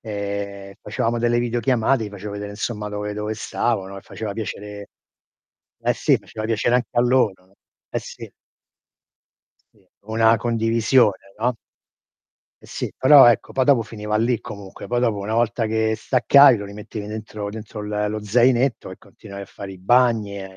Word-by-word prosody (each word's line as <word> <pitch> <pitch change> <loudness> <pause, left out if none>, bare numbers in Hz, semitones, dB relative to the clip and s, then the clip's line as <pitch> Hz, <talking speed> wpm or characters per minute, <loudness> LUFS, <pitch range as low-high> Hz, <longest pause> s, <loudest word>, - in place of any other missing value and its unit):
E, 100 -2 -5
facevamo 115 +2 -2
delle 120 0 +1
videochiamate, 120 0 +1
gli - - -5
facevo 105 0 -8
vedere 105 0 -6
insomma 105 0 -4
dove 105 0 -4
dove 105 +1 -3
stavo, 110 -1 -2
no, 100 +1 -9
e 95 - -10
faceva 110 -2 -6
piacere 105 -1 -7 0.9
eh - - +1
sì, - - +2
faceva 110 - -8
piacere 115 +2 +1
anche 125 - -2
a 120 - +2
loro. 110 -7 +1 0.4
Eh - - -1
sì. - - -10 1.4
Sì. 100 -3 -29 0.2
Una 110 +1 +3
condivisione, 115 -1 +2 0.2
no. 120 +1 0 1.1
Eh - - -20
sì, - - -5
però 135 -1 +8
ecco, 120 -3 +2
poi 130 -1 +1
dopo 135 -5 +4
finiva 105 -1 -4
lì 115 +2 +1
comunque, 100 -3 -9
poi 120 - -1
dopo 115 -4 +1
una 100 +3 -3
volta 115 0 +1
che 110 0 0
staccavi 130 +3 +5
lo 100 - -6
rimettevi 105 +1 -8
dentro 105 -1 -6
dentro 105 0 -8
l 105 0 -2
lo 105 0 -5
zainetto 120 +2 +2
e 95 - -9
continuavi 100 0 -11
a - - -7
fare 100 0 -9
i 95 - -12
bagni 110 -1 +2
e - - -6
110 Hz, 165 wpm, -22 LUFS, 105-120 Hz, 1.4 s, però